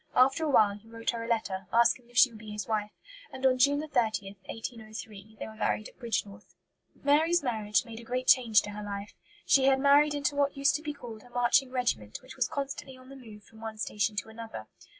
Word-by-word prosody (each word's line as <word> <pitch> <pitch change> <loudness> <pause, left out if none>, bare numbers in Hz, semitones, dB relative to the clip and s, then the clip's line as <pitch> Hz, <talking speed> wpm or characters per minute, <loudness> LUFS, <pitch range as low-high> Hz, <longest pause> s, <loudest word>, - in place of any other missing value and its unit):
After 270 +5 +4
a - - 0
while 215 -7 +5
he 215 +2 -20
wrote 230 0 -3
her 230 -1 -5
a - - -6
letter, 195 -5 -2
asking 235 +1 +3
if 245 - -10
she 255 - +7
would 220 - -12
be 215 0 -10
his 210 0 -5
wife; 210 -1 -1 0.4
and 265 0 -5
on 255 -1 +4
June 285 +3 +3
30, 220 -7 0 0.2
1803, 220 -2 -8
they - - -4
were 220 - -10
married 215 0 -1
at - - -25
Bridgnorth. 210 -4 -4 0.5
Mary's 315 +4 +3
marriage 215 -5 0
made 230 -1 -9
a - - -11
great 250 +2 -3
change 230 -5 +5
in 205 - -6
her 210 - -6
life. 205 +1 -6 0.3
She 270 -1 +4
had 270 0 +4
married 290 +2 +5
into 285 0 -1
what 285 -1 +1
used 280 +1 +3
to - - -12
be 300 -1 -4
called 235 -6 -10
a 245 - -17
"marching 245 +2 +2
regiment," 240 - -2
which 260 - -12
was 255 -2 +1
constantly 275 -3 -5
on 255 0 -16
the 275 - -10
move 220 -5 -13
from 220 +3 -17
one 220 -1 -6
station 210 0 -1
to 210 +1 -3
another. 220 - -8
235 Hz, 230 wpm, -29 LUFS, 215-270 Hz, 0.5 s, she